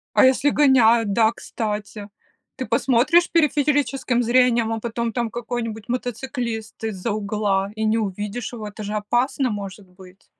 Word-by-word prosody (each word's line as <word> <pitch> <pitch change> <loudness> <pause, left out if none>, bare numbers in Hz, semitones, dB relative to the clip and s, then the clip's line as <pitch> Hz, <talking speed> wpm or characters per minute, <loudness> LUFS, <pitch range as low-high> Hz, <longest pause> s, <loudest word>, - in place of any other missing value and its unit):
А - - +6
если 265 +2 +3
гоняют, 235 -7 +4
да, 225 0 +4
кстати? 210 -2 -5 0.5
Ты - - -4
посмотришь 275 +8 +3
периферическим 290 -5 +1
зрением, 240 -2 +3
а 225 - -3
потом 235 0 -3
там 235 -2 -1
какой-нибудь 230 -2 -5
мотоциклист 240 -2 -4
из-за 215 0 -3
угла, 205 -1 -1
и 220 0 -2
не 220 +1 +2
увидишь 210 +3 -4
его, 215 -3 -6
это 210 +1 -8
же 205 +1 -4
опасно 240 +5 0
может 200 -2 -6
быть. 185 +1 -17
225 Hz, 145 wpm, -22 LUFS, 210-250 Hz, 0.5 s, А